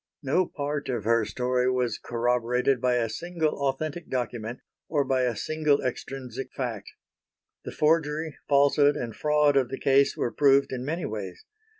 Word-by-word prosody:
No 165 +7 +2
part 145 -1 -4
of 120 -5 -2
her 115 0 +2
story 125 +3 0
was 125 -3 -1
corroborated 125 +2 0
by 125 -1 +2
a 120 -2 +1
single 155 +2 -2
authentic 155 +5 -3
document, 120 -2 -3 0.3
or 150 -3 +2
by 130 -1 +1
a 120 -2 -1
single 155 +4 +1
extrinsic 130 0 -5
fact. 120 -6 -4 0.8
The - - -5
forgery, 155 0 +1
falsehood 145 +1 +4
and 115 -3 -5
fraud 150 -1 +2
of 130 -3 +2
the 135 - -4
case 135 +1 +3
were 120 - -1
proved 140 -1 +4
in 125 -1 -4
many 160 +5 -3
ways. 100 -4 -6
135 Hz, 160 wpm, -26 LUFS, 120-150 Hz, 0.8 s, falsehood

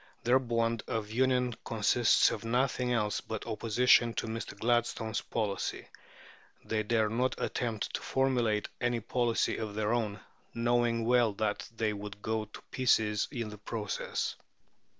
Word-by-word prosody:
Their 125 +2 +5
bond 115 -2 0
of 110 -2 -3
union 125 0 +2
consists 115 +1 +3
of - - -4
nothing 125 +1 +1
else 105 -4 0
but 110 -2 -5
opposition 115 +1 +3
to - - -1
Mr. 115 0 -5
Gladstone's 115 -1 0
policy. 105 -4 -3 0.8
They 110 -1 0
dare 110 0 +2
not 125 +4 0
attempt 115 -3 -2
to - - -2
formulate 120 -6 +1
any 120 -1 0
policy 120 +1 0
of 110 -2 -4
their 110 +1 0
own, 110 -3 -1 0.4
knowing 120 -1 +1
well 120 -2 +4
that 105 0 -2
they 110 -1 +1
would 105 0 -7
go 110 0 -1
to 105 - -12
pieces 110 -5 +2
in 120 -6 -3
the 105 -1 -10
process. 105 -1 -3
115 Hz, 145 wpm, -31 LUFS, 110-120 Hz, 0.8 s, Their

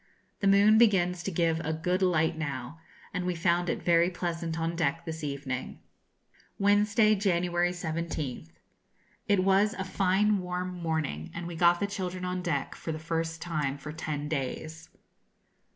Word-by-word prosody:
The 200 - +1
moon 205 +2 +6
begins 180 -6 +3
to 195 - -3
give 165 -1 +1
a 160 0 -2
good 180 +4 -1
light 165 -3 +2
now, 140 -1 -5 0.3
and 180 - -2
we 180 0 -1
found 175 0 +1
it - - -2
very 170 0 +4
pleasant 170 -2 -3
on 165 +1 -1
deck 165 0 -1
this 160 -1 -5
evening. 140 -3 -4 0.8
Wednesday, 210 +2 +4
January 175 -3 +1
17th. 160 - -4 0.8
It 200 -2 +3
was 195 +3 +3
a 190 - -3
fine 195 +2 +2
warm 180 0 -3
morning, 160 - -2
and 170 0 -5
we 170 0 -6
got 175 +1 +4
the 200 - +1
children 185 -2 -4
on 180 0 -2
deck 175 -2 -2
for 160 - -5
the 155 - -3
first 165 0 -3
time 150 -5 -2
for 150 +2 -7
ten 150 -2 -4
days. 155 +3 -4
170 Hz, 160 wpm, -29 LUFS, 160-185 Hz, 0.8 s, moon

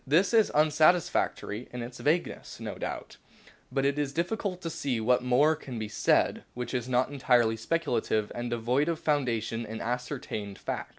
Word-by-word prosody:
This 170 - +3
is 220 -2 +5
unsatisfactory 155 - +2
in 125 -1 -5
its 125 +1 -8
vagueness, 165 +4 -1
no - - -5
doubt; - - -6 0.5
but 135 0 0
it 140 +1 +1
is 145 -2 -1
difficult 180 +3 -2
to 165 - -3
see 135 -6 -1
what 125 +3 +3
more 140 +5 +4
can 130 -5 -8
be 110 -1 -3
said - - +2
which 125 0 -4
is 125 -1 -2
not 130 +2 +2
entirely 120 -5 +3
speculative 115 -5 0
and 120 0 -4
devoid 120 +6 +1
of 165 -2 -1
foundation 120 -6 0
in 110 0 -6
ascertained 120 -4 -4
fact. - - -4
125 Hz, 170 wpm, -29 LUFS, 120-150 Hz, 0.5 s, is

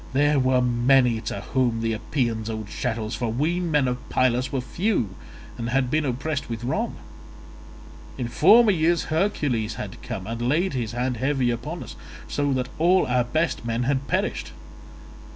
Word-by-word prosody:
There 145 +1 +3
were 130 -1 +3
many 120 -1 +3
to 100 - -3
whom 120 -2 0
the 115 0 0
Epeans 115 -1 -2
owed 110 -2 -5
chattels, 115 -1 -3
for 120 -2 -2
we 155 +9 0
men 150 -6 +1
of 125 0 -1
Pylus 130 0 +1
were 135 - 0
few 145 - -1 0.5
and 115 0 -2
had 130 0 +1
been 155 0 +1
oppressed 140 +2 -2
with 115 0 -5
wrong; 125 - -1 1.2
in 125 -3 -2
former 210 - +6
years 170 -1 +2
Hercules 145 - 0
had 100 -2 -7
come, 95 - -5
and 115 +2 -5
had 120 - 0
laid 170 +5 +1
his 115 -4 -3
hand 125 0 -1
heavy 130 0 +1
upon 140 +9 -5
us, - - -10 0.3
so 145 -1 0
that 130 -1 -1
all 180 +3 +4
our 125 0 +2
best 155 +5 -1
men 115 +1 -1
had 135 +1 0
perished. - - -1
130 Hz, 170 wpm, -24 LUFS, 115-150 Hz, 1.2 s, former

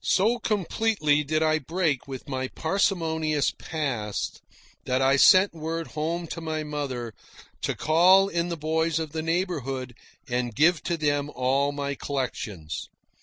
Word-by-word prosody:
So 220 +6 +2
completely 200 -7 +1
did 155 +2 0
I 155 0 +2
break 155 -2 -1
with 130 -2 -7
my 130 -1 -2
parsimonious 160 -3 0
past 130 - -3 0.4
that 130 +1 +1
I 135 +1 +4
sent 185 +7 +6
word 165 0 -4
home 165 +3 -2
to 165 - -5
my 155 -1 -3
mother 135 -6 -4 0.5
to - - -1
call 185 +5 +5
in 170 -2 -1
the 170 - -3
boys 160 +1 0
of 160 -2 -3
the 160 +1 -3
neighbourhood 155 -7 -2 0.3
and 120 -2 -2
give 160 +4 +4
to 170 -2 0
them 145 -2 0
all 135 +3 +1
my 140 0 -3
collections. 115 - -4
155 Hz, 145 wpm, -26 LUFS, 135-170 Hz, 0.5 s, sent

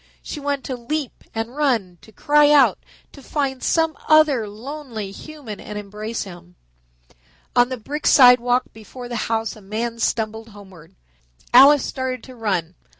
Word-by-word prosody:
She 300 - -6
wanted 285 -1 -2
to 260 - -4
leap 275 +3 -5
and 225 +3 -4
run, 230 - 0
to 220 - -17
cry 295 +5 +3
out, 295 -2 +5 0.3
to 280 - -14
find 270 -2 -3
some 325 -1 +1
other 305 -8 +4
lonely 230 -2 -7
human 265 -3 -9
and 210 - -8
embrace 210 +2 -5
him. 175 -2 -13 1.0
On 245 0 +4
the 255 - -4
brick 290 +7 -4
sidewalk 250 -1 +6
before 235 +3 -10
the 240 - -5
house 225 -1 -1
a 215 - -14
man 230 +4 -4
stumbled 220 0 -2
homeward. 190 -6 -15 0.6
Alice 275 +3 +7
started 260 -2 -4
to 255 - -12
run. 190 -7 -2
240 Hz, 150 wpm, -21 LUFS, 215-280 Hz, 1.0 s, Alice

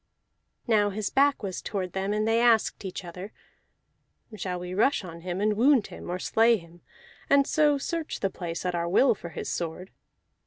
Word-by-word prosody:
Now 210 -4 +3
his 205 0 -3
back 280 -2 +3
was 190 -2 -4
toward 185 -4 -4
them, 195 +1 -2
and 215 +1 0
they 225 +1 +3
asked 230 -3 +3
each 185 0 -6
other: 180 +4 -8 1.0
"Shall 180 -3 -4
we 180 0 -6
rush 220 +5 +2
on 170 -2 -9
him 180 +1 -4
and 210 +1 +1
wound 250 0 +4
him, - - -9
or 180 - -2
slay 225 +5 +3
him, 170 -1 -16 0.5
and 280 0 +5
so 295 -1 +3
search 325 +3 -4
the 195 - -1
place 170 -1 -5
at 180 - 0
our 170 0 -1
will 255 +9 +4
for 175 -4 -9
his - - -6
sword?" 175 +2 -4
200 Hz, 190 wpm, -27 LUFS, 180-230 Hz, 1.0 s, and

